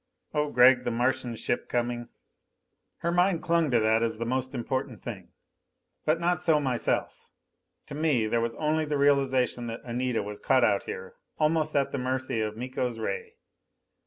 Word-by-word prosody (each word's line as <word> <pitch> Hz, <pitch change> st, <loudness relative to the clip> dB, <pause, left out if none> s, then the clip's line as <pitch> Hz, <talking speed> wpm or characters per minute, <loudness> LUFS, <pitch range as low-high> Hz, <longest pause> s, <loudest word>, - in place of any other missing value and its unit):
"Oh 150 Hz, -1 st, +1 dB
Gregg! 125 Hz, -1 st, +6 dB
The -, -, -1 dB
Martian 125 Hz, +1 st, 0 dB
ship 120 Hz, -, -2 dB
coming!" 120 Hz, 0 st, -2 dB, 0.9 s
Her 170 Hz, -, 0 dB
mind 175 Hz, 0 st, +2 dB
clung 170 Hz, -2 st, +2 dB
to 120 Hz, -2 st, +3 dB
that 110 Hz, +1 st, +3 dB
as 115 Hz, -1 st, -1 dB
the 115 Hz, -, -3 dB
most 130 Hz, +2 st, -2 dB
important 125 Hz, -1 st, -3 dB
thing. -, -, -8 dB, 0.8 s
But 155 Hz, +2 st, +2 dB
not 175 Hz, +1 st, +1 dB
so 160 Hz, -4 st, +3 dB
myself. 130 Hz, -4 st, -2 dB, 0.6 s
To -, -, -9 dB
me 145 Hz, -6 st, +1 dB
there 115 Hz, +2 st, +1 dB
was 115 Hz, 0 st, -2 dB
only 155 Hz, +1 st, 0 dB
the 150 Hz, -1 st, -1 dB
realization 135 Hz, -4 st, +2 dB
that 115 Hz, 0 st, -5 dB
Anita 125 Hz, -1 st, -1 dB
was 105 Hz, 0 st, -7 dB
caught 130 Hz, -, +3 dB
out 100 Hz, -3 st, +2 dB
here, 95 Hz, 0 st, -7 dB, 0.2 s
almost 155 Hz, 0 st, +1 dB
at 140 Hz, -1 st, +2 dB
the 140 Hz, -, -2 dB
mercy 130 Hz, -2 st, -1 dB
of 110 Hz, 0 st, -3 dB
Miko's 125 Hz, -1 st, -3 dB
ray. 460 Hz, -, -4 dB
130 Hz, 170 wpm, -28 LUFS, 120-150 Hz, 0.9 s, Gregg